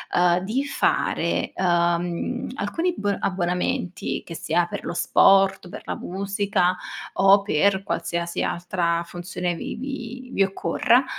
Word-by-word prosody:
uhm, 175 0 +4
di 230 +9 -1
fare, 280 - 0
uhm, 175 +5 0
alcuni 330 - -1
b 205 -1 0
abbonamenti, 180 -1 -1
che 165 - -8
sia 175 +2 +1
per - - -6
lo - - -3
sport, 195 +2 +4
per - - -8
la - - -3
musica, 195 -1 0 0.4
o 195 +1 +6
per 195 +1 +2
qualsiasi 170 -2 -2
altra 170 -1 0
funzione 175 0 -4
vi - - -9
vi 255 -1 -6
vi 195 - +4
occorra, 235 +6 +2
190 Hz, 130 wpm, -24 LUFS, 175-205 Hz, 0.4 s, o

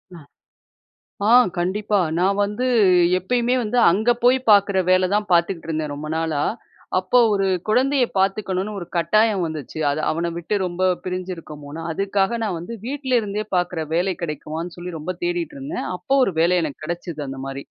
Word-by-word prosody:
அ. - - -10 1.1
ஆ, - - +4 0.3
கண்டிப்பா. 200 +4 0 0.2
நான் 195 +3 +2
வந்து 210 +5 -2 0.5
எப்பயுமே 240 +6 0
வந்து 220 +3 -2
அங்க 215 +7 +1
போய் 250 +2 +5
பார்க்குற 200 -1 +4
வேல 185 0 +4
தான் 210 -1 -1
பார்த்துகிட்டுருந்தேன் 165 -3 0
ரொம்ப 155 +1 -6
நாளா. 160 -3 -1 0.6
அப்பொ 185 +7 +2
ஒரு 195 -1 +1 0.2
குழந்தைய 260 +4 +3
பாத்துக்கணும்னு 195 +1 0
ஒரு 175 - -7
கட்டாயம் 205 +3 +2
வந்துச்சு. 155 -1 -6
அதை 145 +2 -1
அவன 170 +2 -1
விட்டு 175 +5 -2
ரொம்ப 180 +1 -3 0.2
பிரிஞ்சிருக்கோமோன்னு. 165 -5 -6
அதுக்காக 195 +5 0
நான் 195 -6 -2
வந்து, 180 +8 -7
வீட்லருந்தே 245 -6 -1
பார்க்குற 175 -2 0
வேலை 180 +3 +1
கிடைக்குமான்னு 160 +2 -5
சொல்லி 175 -1 -6
ரொம்ப 180 +5 -4
தேடிட்டுருந்தேன். 335 -4 -3
அப்ப 180 - -33
ஒரு 195 - 0
வேலை 175 +2 +3
எனக்கு 155 -1 -6
கெடைச்சது 170 -2 -5
அந்த 135 - -7
மாரி. 135 0 -6
185 Hz, 150 wpm, -22 LUFS, 165-215 Hz, 1.1 s, போய்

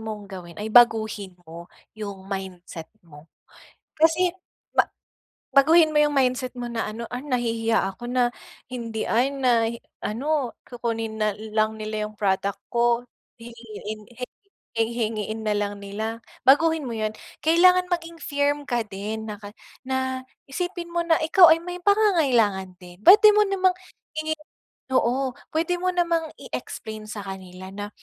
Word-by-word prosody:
mong 215 -2 -6
gawin 175 -3 -9
ay 215 +1 -5
baguhin 220 -5 +4
mo 170 +1 -10 0.2
yung 200 -3 -7
mindset 185 -4 -6 0.2
mo 155 -1 -15 0.7
kasi 325 +3 +4 0.5
ma - - +6 0.7
baguhin 315 +4 +6
mo 300 - +1
yung 295 0 +2
mindset 255 -1 +1
mo 245 -1 -4
na 230 -1 -2
ano, 230 +2 -6
"ah 245 - -3
nahihiya 230 -4 0
ako 240 - -10
na 250 -1 +3 0.4
hindi, 230 -3 -4
ay 255 +5 +2
na 245 -4 +3 0.4
ano 270 +2 -1
kukunin 225 -2 -3
na 215 -1 +1 0.2
lang 215 0 +2
nila 215 0 -2
yung 215 - -13
product 195 0 0
ko, 235 0 +3 0.4
hihingi 220 -2 -8
hi 250 - -2 0.6
hingiin 220 -2 -3
nalang 205 -1 -1
nila." 220 +3 -4 0.3
Baguhin 320 +2 +5
mo 235 - -4
'yon. 215 -1 -1 0.3
Kailangan 360 +3 +5
maging 335 -1 -3
firm 285 0 0
ka 240 -1 +1
din 210 +3 -5
naka 205 -1 -7 0.4
na 260 0 -1 0.3
isipin 350 +3 -4
mo 345 - +1
na 325 -1 +4
ikaw 335 +2 +7
ay 320 - +6
may 355 0 -6
pangangailangan 260 - +3
din 180 +1 -13
puwede 420 - +9
mo 425 - +6
namang 375 -1 +3 0.4
hingiin, 315 0 -2 0.5
oo 260 +2 +2 0.2
puwede 330 +3 0
mo 365 - +1
namang 335 -2 +1
i-explain 215 -1 -7
sa 205 -1 -5
kanila 185 -1 -8
na, 205 +1 -5
235 Hz, 145 wpm, -24 LUFS, 210-300 Hz, 0.7 s, puwede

